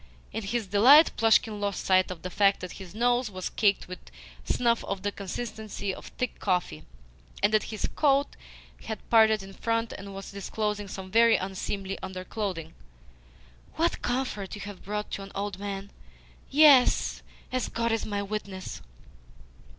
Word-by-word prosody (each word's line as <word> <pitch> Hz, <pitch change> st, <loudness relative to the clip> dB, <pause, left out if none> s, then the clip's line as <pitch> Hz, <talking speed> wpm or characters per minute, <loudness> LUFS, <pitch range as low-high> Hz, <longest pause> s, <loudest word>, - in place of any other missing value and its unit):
In 225 Hz, -, -2 dB
his 220 Hz, +2 st, -2 dB
delight 245 Hz, -, +7 dB
Plushkin 220 Hz, -1 st, +3 dB
lost 200 Hz, -1 st, -2 dB
sight 185 Hz, -1 st, +4 dB
of 180 Hz, -3 st, -7 dB
the 180 Hz, -, -5 dB
fact 200 Hz, +1 st, +3 dB
that 185 Hz, -, -6 dB
his 190 Hz, +1 st, -11 dB
nose 245 Hz, +1 st, +2 dB
was 185 Hz, -2 st, -5 dB
caked 205 Hz, -2 st, +2 dB
with 185 Hz, 0 st, -7 dB, 0.4 s
snuff 235 Hz, -1 st, +1 dB
of 195 Hz, -1 st, -4 dB
the 205 Hz, -, 0 dB
consistency 210 Hz, 0 st, -5 dB
of -, -, -10 dB
thick 250 Hz, -2 st, -3 dB
coffee, 175 Hz, -, -1 dB, 0.6 s
and 210 Hz, -, +4 dB
that 215 Hz, -, +3 dB
his 215 Hz, -2 st, -3 dB
coat 280 Hz, -1 st, +2 dB, 0.5 s
had 220 Hz, -1 st, -6 dB
parted 220 Hz, -2 st, +5 dB
in 195 Hz, 0 st, -11 dB
front 230 Hz, +2 st, -1 dB
and 195 Hz, 0 st, -8 dB
was 195 Hz, -, -8 dB
disclosing 210 Hz, +1 st, -3 dB
some 190 Hz, 0 st, -8 dB
very 230 Hz, +1 st, +6 dB
unseemly 195 Hz, +1 st, -3 dB
underclothing. 185 Hz, -3 st, -5 dB, 1.0 s
"What 335 Hz, +2 st, 0 dB
comfort 245 Hz, -7 st, -2 dB
you 205 Hz, -, -8 dB
have 205 Hz, -2 st, -8 dB
brought 210 Hz, +1 st, -4 dB
to -, -, -4 dB
an 195 Hz, 0 st, -9 dB
old 200 Hz, -1 st, -3 dB
man! 200 Hz, 0 st, -5 dB, 0.6 s
Yes, 285 Hz, -3 st, +5 dB, 0.3 s
as 255 Hz, -1 st, -1 dB
God 230 Hz, 0 st, -1 dB
is 225 Hz, -, 0 dB
my 205 Hz, -1 st, -2 dB
witness!" 200 Hz, -2 st, -5 dB
205 Hz, 160 wpm, -28 LUFS, 195-230 Hz, 1.0 s, delight